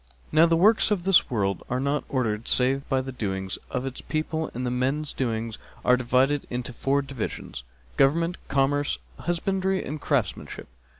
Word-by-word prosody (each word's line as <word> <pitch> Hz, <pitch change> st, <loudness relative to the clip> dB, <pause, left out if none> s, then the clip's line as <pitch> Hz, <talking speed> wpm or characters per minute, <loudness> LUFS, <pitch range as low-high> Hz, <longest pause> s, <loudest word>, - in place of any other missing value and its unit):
Now 160 Hz, +2 st, +6 dB
the 165 Hz, -, +3 dB
works 215 Hz, +7 st, +5 dB
of 200 Hz, -5 st, 0 dB
this 190 Hz, -2 st, +4 dB
world 100 Hz, -5 st, 0 dB
are 125 Hz, -, 0 dB
not 140 Hz, +2 st, 0 dB
ordered 115 Hz, -5 st, -1 dB
save 135 Hz, +2 st, +2 dB
by 135 Hz, -2 st, +2 dB
the 135 Hz, 0 st, -6 dB
doings 95 Hz, -6 st, -3 dB
of 125 Hz, -, -2 dB
its 135 Hz, -1 st, -5 dB
people, 155 Hz, 0 st, -2 dB
and 125 Hz, -, -3 dB
men's 130 Hz, +5 st, 0 dB
doings 115 Hz, -3 st, -2 dB, 0.3 s
are 125 Hz, -, +6 dB
divided 130 Hz, +3 st, +2 dB
into 125 Hz, 0 st, -4 dB
four 140 Hz, +4 st, +1 dB
divisions, 130 Hz, -, -5 dB, 0.3 s
government, 165 Hz, +5 st, +3 dB
commerce, 140 Hz, +1 st, +1 dB, 0.2 s
husbandry 190 Hz, +2 st, 0 dB
and 150 Hz, +2 st, -5 dB
craftsmanship. 135 Hz, -8 st, -2 dB
135 Hz, 160 wpm, -26 LUFS, 125-155 Hz, 0.3 s, Now